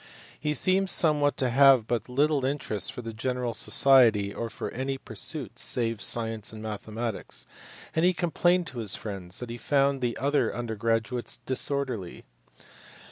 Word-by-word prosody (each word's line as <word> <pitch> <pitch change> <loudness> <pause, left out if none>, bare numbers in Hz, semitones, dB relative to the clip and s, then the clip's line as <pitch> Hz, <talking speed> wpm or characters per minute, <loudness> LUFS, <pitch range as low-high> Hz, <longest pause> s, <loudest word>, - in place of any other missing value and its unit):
He 150 0 -1
seems 190 +5 +3
however 150 -3 +3
to 130 - +1
have 135 +1 +7
had 110 - -23
but 120 -1 -2
little 145 +2 +1
interest 130 -8 -1
for 125 - -8
general 120 +2 -3
society 115 -7 +4
or 115 - -4
for - - -6
any 135 +2 -3
pursuits 110 -6 -2
save 115 -3 -2
science 115 -2 -1
and 110 - -10
mathematics, 110 +1 -4 0.5
and 160 - +2
he 180 - +5
complained 175 0 +1
to 125 -6 -6
his 105 -4 -1
friends 95 -4 -7
that 125 -1 -6
he 120 - -7
found 140 0 +1
the 120 -1 -1
other 140 +3 0
under 120 -2 -4
graduates 115 +2 -1
disorderly. 130 -7 -1
125 Hz, 155 wpm, -27 LUFS, 110-140 Hz, 0.5 s, have